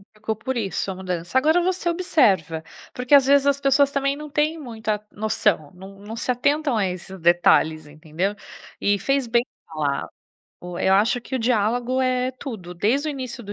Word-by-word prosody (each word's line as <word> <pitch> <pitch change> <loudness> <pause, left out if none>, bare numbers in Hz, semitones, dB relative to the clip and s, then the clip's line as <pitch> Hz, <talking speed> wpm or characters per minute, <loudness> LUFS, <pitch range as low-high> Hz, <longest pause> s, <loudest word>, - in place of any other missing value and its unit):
Ficou 215 +1 -3
por 260 +4 -4
isso, 200 -3 -2
a - - -6
mudança. 180 +1 -5
Agora 315 +6 +3
você 365 -1 0
observa, 195 - +1 0.3
porque 250 +3 +3
às 275 -2 +6
vezes 280 +1 +4
as 280 0 +2
pessoas 280 0 +3
também 275 0 0
não 300 +1 -8
têm 305 +2 0
muita 220 -5 -4
noção, 210 -7 0
não 190 +2 -12
não 210 +2 -8
se 240 - -1
atentam 285 +1 +1
a 200 - +2
esses 185 +1 -7
detalhes, 160 -2 +3
entendeu? 160 +7 -3 0.4
E 205 -1 +1
fez 275 +6 0
bem 235 0 +2 0.2
falar, 155 -4 -2 0.5
o 180 0 -7
eu 190 - +2
acho 210 +5 +3
que 265 - -7
o - - +1
diálogo 240 +2 0
é 255 0 +1
tudo, 215 -10 -8
desde 250 - +1
o - - 0
início 255 -3 -6
do 205 -1 -7
225 Hz, 185 wpm, -23 LUFS, 190-275 Hz, 0.5 s, às